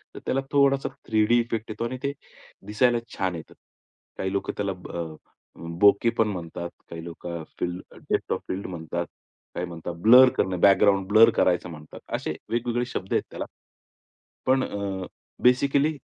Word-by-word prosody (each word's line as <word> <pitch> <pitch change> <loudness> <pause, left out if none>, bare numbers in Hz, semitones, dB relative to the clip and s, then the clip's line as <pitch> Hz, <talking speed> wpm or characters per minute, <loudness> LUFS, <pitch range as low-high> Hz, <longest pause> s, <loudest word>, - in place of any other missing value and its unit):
तर - - -6
त्याला 135 - +1
थोडासा 140 -1 +3 0.2
3D 110 +2 +3
इफेक्ट 115 -1 -3
येतो 115 - -3
आणि 130 +2 -4
ते 140 - 0 0.6
दिसायला 120 +3 +3 0.2
छान 95 -2 -1
येतं. 80 - -9 0.6
काही 95 - -2
लोकं 100 - -2
त्याला 100 -1 -1
ब 90 - -12
अ, 80 -2 -5 0.6
बोके 100 +3 +5
पण 110 - +4
म्हणतात. 85 -3 -5 0.2
काही 85 -1 -7
लोकं 85 0 -6
स्टील 90 0 -3 0.3
"डेप्थ - - 0
ऑफ - - -2
फील्ड" 95 +2 -4
म्हणतात. 85 -1 -4 0.5
काही 90 - -2
म्हणतात 85 0 -6
ब्लर 125 +2 +9
करणे, 95 -1 +1
बॅकग्राऊंड 95 0 +4
ब्लर 110 +3 +7
करायचं 90 0 +2
म्हणतात. 75 -2 -11 0.2
असे - - -3
वेगवेगळे 120 +1 0
शब्द 95 -6 -5
आहेत - - +2
त्याला. - - -5 1.0
पण 130 0 +3
अ, 100 -2 -4 0.4
बेसिकली 140 +4 +3
100 Hz, 155 wpm, -25 LUFS, 90-120 Hz, 1.0 s, ब्लर